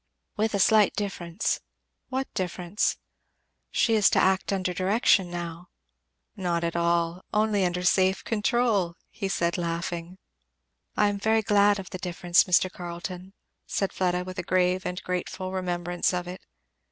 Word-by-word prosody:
"With 215 0 0
a - - 0
slight 210 +1 +4
difference." 175 -5 -2 0.5
"What 265 +1 -3
difference?" 180 +1 -1 0.7
"She 230 - +2
is 215 -2 +5
to - - +2
act 190 +1 +2
under 185 -2 -1
direction 190 0 +3
now." 175 0 -6 0.7
"Not 175 -2 -1
at 170 0 -2
all 170 +1 +1
only 210 -2 +2
under 180 0 -1
safe 190 +1 +3
control," 220 -5 +1 0.2
he 195 - -4
said 170 -2 0
laughing. 170 +1 -3 0.8
"I 210 - +4
am 200 0 -3
very 220 +1 +2
glad 205 0 +4
of 190 -2 -8
the 185 - -5
difference, 175 -1 +2
Mr. 180 +1 +4
Carleton," 180 +1 -7 0.3
said 195 - -1
Fleda, 180 -1 0
with 185 0 -7
a - - -2
grave 185 +1 +1
and 180 0 -3
grateful 180 +1 -3
remembrance 175 -1 -1
of 180 0 -3
it. 180 +1 -7
185 Hz, 150 wpm, -26 LUFS, 175-200 Hz, 0.8 s, is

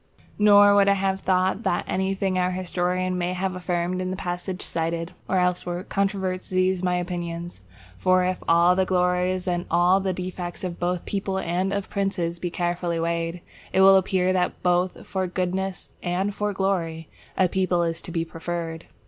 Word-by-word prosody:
Nor 205 -1 +7
would 200 -1 +5
I 200 - +6
have 190 0 0
it - - -24
thought 185 +2 +2
that 175 - 0
anything 190 0 0
our 180 0 +2
historian 180 0 -1
may 175 +1 -1
have 185 +1 -2
affirmed 180 0 -2
in 185 - -2
the 185 - -3
passage 180 +1 -4
cited, 165 +1 -2 0.2
or 190 - +2
elsewhere, 180 0 0
controverts 190 -2 -2
these 185 0 +1
my 180 -1 +1
opinions. 175 - -4 0.4
For 185 0 +3
if 185 0 -1
all 170 +2 +5
the 190 - +3
glories 180 0 +1
and 175 0 -1
all 180 +2 +4
the 190 -1 -1
defects 180 -1 -5
both 175 0 -2
of - - -23
peoples 195 -1 -2
and 180 +3 0
of 200 -1 -3
princes 185 -4 -1
be 175 - -2
carefully 175 -1 -1
weighed, 170 +1 -2 0.3
it 190 - +3
will 195 0 +8
appear 185 -1 +2
that 180 -1 -1
both 180 +1 +1
for 190 -1 -2
goodness 185 +1 -3
and 190 +3 -1
for 210 +1 -1
glory 175 -5 -1 0.3
a 185 - +4
people 180 -1 +1
is 165 0 -2
to - - -8
be 165 0 -1
preferred. 165 0 -5
180 Hz, 180 wpm, -24 LUFS, 175-190 Hz, 0.4 s, will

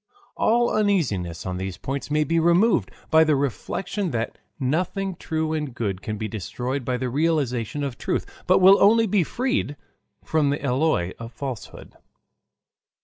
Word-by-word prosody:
All 240 +2 +2
Uneasiness 130 - 0
on 90 -1 -3
these 95 -1 -4
Points 140 +1 -4
may 150 +1 +2
be 165 +3 +1
Removed 170 - +3 0.2
by 160 0 +7
the 155 -2 +3
Reflection 180 - -2
that 115 -5 -3 0.2
Nothing 180 +7 -1
True 160 -1 -2
and 150 -5 -3
Good 100 -5 -2
can 110 -1 -4
be 110 +1 -3
Destroyed 125 +6 -4
by 125 +1 -1
the 130 - -2
Realization 145 -2 0
of 135 -4 -4
Truth, - - -1 0.2
but - - +5
will 190 +2 +7
only 225 +3 +6
be 200 -3 +2
Freed 250 - -1 0.5
from 155 -3 +1
the 145 - 0
Alloy 125 - +1
of 115 0 -7
Falsehood. 130 -1 -7
145 Hz, 155 wpm, -24 LUFS, 120-175 Hz, 0.5 s, by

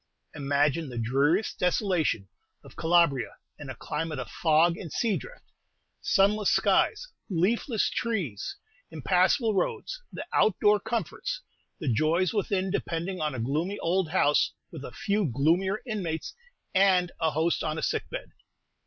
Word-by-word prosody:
Imagine 145 +2 0
the 120 - -7
dreariest 140 - +1
desolation 180 - +1 0.4
of - - -15
Calabria 165 -6 +2 0.2
in 145 -2 -8
a 130 - -6
climate 150 +4 -4
of 130 - -6
fog 165 +1 +3
and 170 -3 -8
sea 225 -4 +1
drift: - - -8 0.6
sunless 205 +1 +3
skies, - - +2 0.2
leafless 215 - +1
trees, 185 - -3 0.3
impassable 205 +6 +2
roads, 445 - -2
the - - -6
out 215 - +3
door 210 0 +4
comforts; 235 - -3 0.4
the 160 - -5
joys 160 +8 +2
within 195 -2 0
depending 175 0 -3
on 150 -3 -1
a - - -4
gloomy 155 - -1
old 175 0 0
house, 150 -4 +2 0.2
with 155 -5 -8
a - - -7
few 210 -3 0
gloomier 170 - +1
inmates, 180 - -3 0.4
and 185 -2 +4
a 160 - +3
host 160 +2 0
on 155 0 -2
a - - -4
sick - - -1
bed. - - -6
175 Hz, 145 wpm, -27 LUFS, 150-200 Hz, 0.6 s, door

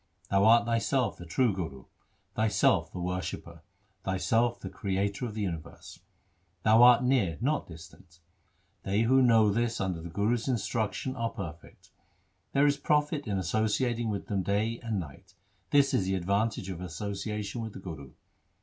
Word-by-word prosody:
Thou 100 0 +4
art 115 +1 +6
Thyself 115 +2 0
the 85 - -10
True 115 +6 +2
Guru, 80 -9 -6 0.5
Thyself 110 0 +2
the - - -6
Worshipper, 90 -1 -4 0.4
Thyself 115 +5 +1
the - - -7
Creator 100 +2 -2
of 110 - -8
the 110 - -2
universe. 85 -5 -7 0.6
Thou 110 +1 +5
art 125 0 +7
near, 120 - +2
not 145 +6 0
distant. 85 +1 -14 0.6
They 100 +3 0
who 130 +3 +4
know 115 -4 +5
this 115 +2 -1
under 95 -4 -2
the 85 - -7
Guru's 110 +7 0
instruction 120 +1 -2
are 115 -2 -1
perfect. 85 - -9 0.6
There 140 +1 +4
is 145 -1 +3
profit 150 -1 0
in 100 -2 -1
associating 110 +5 0
with 100 -2 -3
them 100 -2 -1
day 105 +5 -1
and 115 -4 -2
night; 90 +5 -10 0.3
this 140 -1 +4
is 95 - +2
the 95 +1 0
advantage 100 +2 -1
of 90 -1 -7
association 100 +4 -4
with 110 -2 -6
the - - -8
Guru. 80 -8 -9
105 Hz, 160 wpm, -29 LUFS, 95-120 Hz, 0.6 s, art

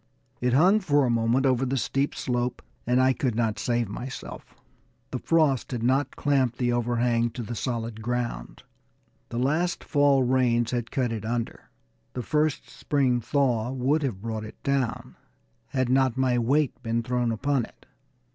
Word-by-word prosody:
It 125 0 +1
hung 185 +10 +5
for 145 -8 +2
a 120 - +1
moment 115 +3 +2
over 130 -1 +2
the 135 +1 0
steep 135 +3 -1
slope, 125 -1 -2 0.2
and 125 +1 +3
I 130 0 +4
could 125 -4 -1
not 110 -2 0
save 120 -2 0
myself. 125 +6 -8 0.6
The 130 - -3
frost 155 -6 +2
had 115 -2 -3
not 135 +3 +1
clamped 130 -4 +1
the 120 -1 +1
over 120 0 0
hang 120 0 +2
to 120 +1 -6
the 115 +2 -5
solid 115 -2 -3
ground. 120 - -4 0.7
The 120 - -5
last 155 +8 0
fall 145 -3 +3
rains 120 -2 +2
had 120 -2 -2
cut 130 -4 -1
it 110 -2 -4
under; 115 +1 -4 0.4
the 125 - -4
first 150 +3 0
spring 130 -4 0
thaw 125 -3 +1
would 135 +4 +1
have 115 -9 -3
brought 110 -2 -3
it 110 - -10
down, 135 -5 -1 0.5
had 130 -2 -1
not 130 -1 +2
my 130 -2 +2
weight 130 +2 +1
been 115 -1 -1
thrown 125 -1 0
upon 135 +3 0
it. - - -21
125 Hz, 170 wpm, -26 LUFS, 120-135 Hz, 0.7 s, hung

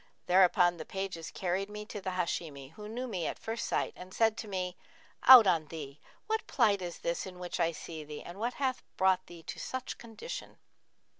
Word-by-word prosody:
Thereupon 180 -1 +5
the 160 - -5
pages 190 -2 -4
carried 190 +2 -2
me 210 0 -6
to 210 -1 -7
the 190 - -3
Hashimi, 155 -6 -3
who 210 +5 -9
knew 245 +3 -4
me 185 -8 -2
at - - -3
first 225 0 -4
sight - - 0
and 185 +1 -10
said 225 -1 +4
to 230 - -5
me, 185 -2 -3 0.5
'Out 255 -4 +12
on 165 -5 +2
thee! 150 -3 -8 0.3
What 440 +1 -1
plight 200 -3 +3
is 175 -1 -5
this 170 +3 -2
in 180 -1 -9
which 180 0 -5
I 170 -1 +3
see 160 0 -7
thee 150 0 -8
and 175 +3 -9
what 240 +3 -1
hath 260 -2 -1 0.2
brought 185 0 +3
thee 170 -1 -12
to - - -7
such 260 -1 -4
condition?' 470 - -8
185 Hz, 205 wpm, -32 LUFS, 170-220 Hz, 0.5 s, Out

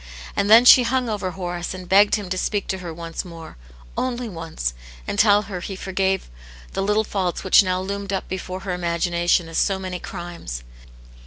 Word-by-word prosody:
And 200 0 +1
then 230 +3 +8
she 250 - +10
hung 250 0 0
over 205 -3 -2
Horace 175 -1 -4
and 185 -1 -9
begged 200 +2 +5
him 205 -3 -4
to - - +1
speak 205 0 -1
to 190 - -2
her 175 -2 -6
once 165 0 -5
more, 165 -2 -10 0.4
only 250 -1 -2
once, 165 - -4 0.3
and 200 - -2
tell 205 -1 +5
her 195 -3 -6
he 195 +2 -6
forgave 190 0 -1 0.5
the - - -1
little 210 +2 +2
faults 190 -4 -2
which 190 - +7
now 185 -2 0
loomed 200 +1 -4
up 195 - -2
before 185 0 -5
her 195 -2 -3
imagination 175 0 +1
as 165 - -2
so 195 -2 +2
many 185 -1 -5
crimes. 170 - -7
190 Hz, 190 wpm, -22 LUFS, 175-200 Hz, 0.5 s, she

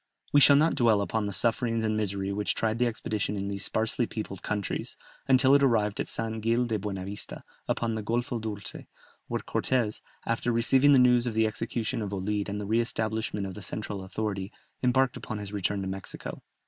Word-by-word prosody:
We 145 - +7
shall 140 0 +8
not 155 +3 +4
dwell 115 -5 +4
upon 105 +2 -1
the - - -3
sufferings 115 +2 +1
and 110 -1 +1
misery 100 -2 -1
which 105 0 0
tried 115 +1 0
the 125 - +3
expedition 110 -2 -2
in 100 0 -3
these 100 +1 -2
sparsely 115 +2 0
peopled 100 -4 -6
countries, 105 -2 -3 0.3
until 130 0 +6
it 140 - +6
arrived 110 -6 +2
at - - -1
San 110 0 -2
Gil 115 +3 +2
de 110 -3 -1
Buena 95 -2 -4
Vista, 100 +1 -6 0.2
upon 115 -1 0
the 110 - -2
Golfo 120 +2 -1
Dolce, 105 -2 -6 0.4
where - - -2
Cortès, 120 -5 0 0.2
after 115 +1 0
receiving 130 +5 +5
the - - +7
news 125 -1 +5
of 115 - -3
the 110 0 +4
execution 115 +1 -2
of 100 -1 -4
Olid 100 +2 -2
and 105 +1 -3
the 105 - -4
re 110 +3 +2
establishment 110 -3 -1
of 95 - -5
the 105 - -9
central 100 0 -5
authority, 100 +1 -3 0.3
embarked 130 0 +2
upon 110 - -5
his 105 0 -7
return 100 0 -1
to - - -3
Mexico. 95 0 -6
110 Hz, 200 wpm, -28 LUFS, 100-120 Hz, 0.4 s, shall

